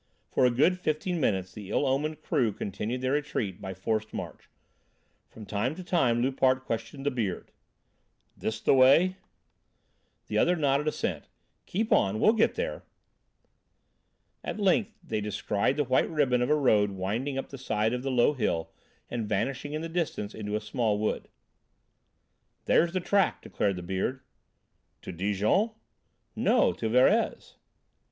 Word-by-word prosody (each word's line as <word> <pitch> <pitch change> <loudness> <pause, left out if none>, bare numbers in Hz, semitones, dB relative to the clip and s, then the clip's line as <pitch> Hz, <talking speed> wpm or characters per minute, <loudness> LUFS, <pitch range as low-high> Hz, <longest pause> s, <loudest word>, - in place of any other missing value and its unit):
For 130 - +3
a - - +4
good 155 +10 +2
fifteen 170 +2 -1
minutes 95 -8 0
the 105 -3 -9
ill - - +1
omened 145 +3 -1
crew 115 -5 +1
continued 105 +6 -4
their 130 0 0
retreat 140 -10 -2
by 95 0 -6
forced 110 +3 -2
march. - - -7 0.8
From 110 - -11
time 110 +8 -1
to 185 - -8
time 125 -10 +2
Loupart 130 0 +2
questioned 115 +5 -4
the 145 - +2
"Beard": 110 -8 -3 0.8
"This 110 0 -3
the - - +4
way?" 140 +8 +5 1.1
The 105 - -1
other 175 +8 +3
nodded 145 -2 +1
assent: 155 - -2 0.4
"Keep 220 +4 -2
on, 100 +3 +2
we'll 215 - +5
get 225 -1 +2
there." - - -3 1.6
At - - -4
length 200 +1 +1
they 110 -1 -3
descried 105 +4 -1
the 145 - +2
white 130 -1 +2
ribbon 135 -6 +2
of 125 - 0
a 150 - +5
road 110 -8 +3
winding 105 +9 -3
up 135 - -4
the 135 - -9
side 110 -3 0
of 125 - -2
the 135 - -3
low 125 +2 +3
hill 105 - -1 0.4
and 115 -3 -4
vanishing 140 +2 -2
in 155 +1 -3
the - - -3
distance 160 -11 -3
into 105 -1 -4
a 105 - -1
small 105 -1 0
wood. 105 +1 -2 1.4
"There's 170 +1 +3
the 185 - 0
track," 195 +1 +1
declared 100 -2 -1
the 90 - -6
Beard. 95 +9 -2 0.8
"To - - -6
Dijon?" 105 - +1 0.7
"No, - - +3
to 110 - -3
Verrez." 125 +3 +2
125 Hz, 155 wpm, -28 LUFS, 105-150 Hz, 1.6 s, way